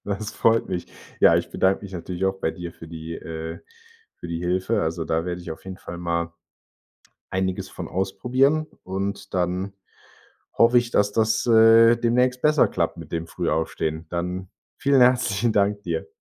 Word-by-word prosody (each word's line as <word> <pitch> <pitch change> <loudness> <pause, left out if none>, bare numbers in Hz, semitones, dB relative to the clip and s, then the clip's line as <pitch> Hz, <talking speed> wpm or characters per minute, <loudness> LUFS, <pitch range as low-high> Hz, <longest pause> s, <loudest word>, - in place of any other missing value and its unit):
Das 105 +1 -4
freut 115 0 +2
mich. 90 -2 -3 0.3
Ja, - - +7
ich - - -2
bedanke 95 +2 +1
mich 100 -1 -9
natürlich 90 +1 -4
auch 95 0 0
bei - - 0
dir 85 0 -7
für 80 - -12
die 80 0 -7
äh, 80 0 -6 0.6
für 85 - -9
die 85 0 -3
Hilfe. 95 +5 0
Also, 80 +1 -2
da 80 +1 -1
werde 90 0 -4
ich 85 -1 -8
auf 80 - -8
jeden 95 -1 -7
Fall 85 - -8
mal 85 -1 -2 1.0
einiges 95 0 -2
von - - -7
ausprobieren 130 - +1 0.2
und 100 +1 -4
dann 90 +2 -1 0.8
hoffe 115 +1 +4
ich, 120 -1 -1
dass 105 -2 +2
das, 110 +1 +1
äh, 115 0 +7
demnächst 125 +2 +1
besser 150 -2 +4
klappt - - -2
mit - - -10
dem 85 0 -3
Frühaufstehen. 80 0 -2
Dann 90 +1 -3 0.3
vielen 140 -1 +3
herzlichen 120 -3 +3
Danke 100 0 +2
dir. 85 -3 -4
95 Hz, 170 wpm, -24 LUFS, 85-115 Hz, 1.0 s, Ja